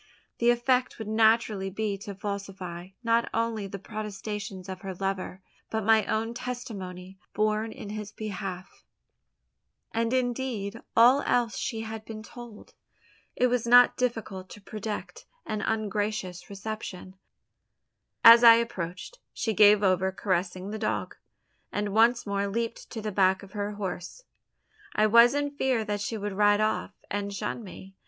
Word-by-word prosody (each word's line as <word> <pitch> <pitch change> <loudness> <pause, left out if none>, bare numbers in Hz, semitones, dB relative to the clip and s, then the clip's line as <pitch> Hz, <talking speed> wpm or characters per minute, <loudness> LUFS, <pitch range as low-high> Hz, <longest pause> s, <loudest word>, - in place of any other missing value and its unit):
The 235 - +4
effect 250 +1 +2
would 220 - -6
naturally 220 -2 +2
be 205 +1 -2
to 200 0 -7
falsify, 195 -3 -6 0.2
not 230 0 +2
only 225 -3 -1
the 200 +1 -6
protestations 205 -1 -6
of 185 -1 -7
her 190 -2 -6
lover, 190 0 -3 0.3
but 220 -1 -2
my 220 0 +4
own 225 +1 -1
testimony 195 -7 -7 0.2
borne 215 +1 +1
in 205 - -9
his 210 -1 -6
behalf, 195 -4 -6 1.1
and 230 0 0
indeed 245 -4 -2 0.2
all 250 +5 +7
else 235 -4 +1
she 225 0 -3
had 220 0 -6
been 220 -1 -8
told. 235 -2 -12 0.6
It 250 - +2
was 245 -2 +1
not 245 +1 +7
difficult 220 -6 -3
to - - -11
predict 210 +1 -6 0.2
an 215 -1 -3
ungracious 210 -4 -2
reception. 200 -2 -7 1.1
As 230 +1 +10
I 230 -1 +10
approached, 215 - -4
she 225 - -1
gave 210 0 +6
over 190 0 +2
caressing 185 0 -2
the 220 - -4
dog; 215 - -2 0.6
and 205 0 -2
once 230 +3 +4
more 200 0 -1
leaped 230 +3 -3
to 220 -3 -6
the 215 - -2
back 190 0 +2
of 195 - -13
her 205 0 -3
horse. 195 - -6 0.7
I 215 - +4
was 235 +4 +6
in 285 0 0
fear 260 -5 0
that 205 -1 -2
she 220 +2 -3
would 205 -1 -4
ride 205 +1 +4
off, 215 0 -1 0.2
and 200 0 -2
shun 200 +4 -4
me. 195 -1 -11
215 Hz, 150 wpm, -27 LUFS, 195-230 Hz, 1.1 s, As